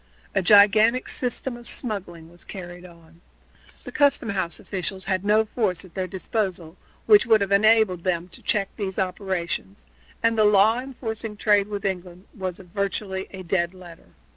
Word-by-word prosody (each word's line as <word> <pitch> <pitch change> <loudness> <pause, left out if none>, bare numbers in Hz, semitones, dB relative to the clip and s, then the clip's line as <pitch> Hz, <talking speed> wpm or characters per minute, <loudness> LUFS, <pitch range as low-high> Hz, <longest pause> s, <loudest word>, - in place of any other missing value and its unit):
A 195 - +2
gigantic 215 +5 +5
system 250 0 -2
of 240 0 -10
smuggling 180 -8 -5
was 175 - -15
carried 175 -2 -9
on. 165 -1 -19 0.6
The - - -8
custom 285 -5 +2
house 190 -5 -2
officials 190 0 -5
had 185 -1 -1
no 215 +2 +3
force 205 -5 -2
at 180 - -17
their 185 -1 -3
disposal 185 -3 -3 0.3
which 420 - +6
would 220 -2 +5
have 200 0 -1
enabled 210 -3 +4
them 175 -2 -1
to - - -12
check 200 -2 0
these 195 -3 -4
operations, 190 0 -3 0.4
and 230 0 +3
the - - +6
law 210 +3 +5
enforcing 230 -4 -6
a - - -14
trade 205 -1 +2
with 205 -1 -5
England 180 -1 -4
was 185 -2 -4
virtually 195 0 -4
a 190 -1 -9
dead 175 0 -1
letter. 175 -3 -14
195 Hz, 165 wpm, -24 LUFS, 180-215 Hz, 0.6 s, which